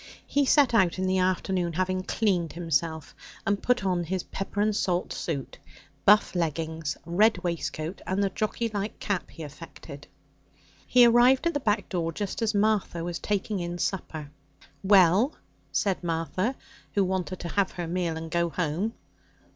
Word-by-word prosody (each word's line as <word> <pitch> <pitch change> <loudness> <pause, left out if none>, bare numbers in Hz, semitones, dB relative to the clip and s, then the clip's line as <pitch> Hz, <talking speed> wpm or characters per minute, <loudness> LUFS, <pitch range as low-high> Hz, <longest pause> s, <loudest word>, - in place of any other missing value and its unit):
He 285 0 +1
set 280 -4 +5
out 190 -7 +3
in 185 - -1
the 185 0 +2
afternoon, 185 -1 0
having 185 +2 0
'cleaned' 185 -4 0
himself 165 -1 -1 0.3
and 200 0 0
put 250 -5 +1
on 180 -2 +1
his 185 +2 -2
pepper 195 +1 -5
and 210 0 +2
salt 180 -3 0
suit, 140 -6 -4 0.5
buff 210 +1 +5
leggings, 160 -2 -2
red 205 +6 +3
waistcoat, 170 0 -3
and 190 +2 +1
the 195 - 0
jockey 215 +3 -1
like 205 0 -4
cap 200 -4 -2
he 165 - -9
affected. 150 -1 -10 0.8
He 245 -1 +7
arrived 245 +4 +5
at 340 - +2
the 290 - 0
back 215 -4 0
door 170 -3 -2
just 200 +6 -4
as 220 -1 +1
Martha 205 -5 +1
was 175 0 -4
taking 205 0 -1
in 175 0 -4
supper. 155 -6 -3 0.5
'Well?' 195 - +5 0.4
said 195 -3 0
Martha, 175 +8 -1 0.4
who 200 - +4
wanted 185 -1 -2
to 170 - -5
have 200 +2 0
her 175 - -4
meal 170 -1 -2
and 160 0 -7
go 170 0 +1
home. 175 +6 -1
185 Hz, 165 wpm, -27 LUFS, 170-205 Hz, 0.8 s, He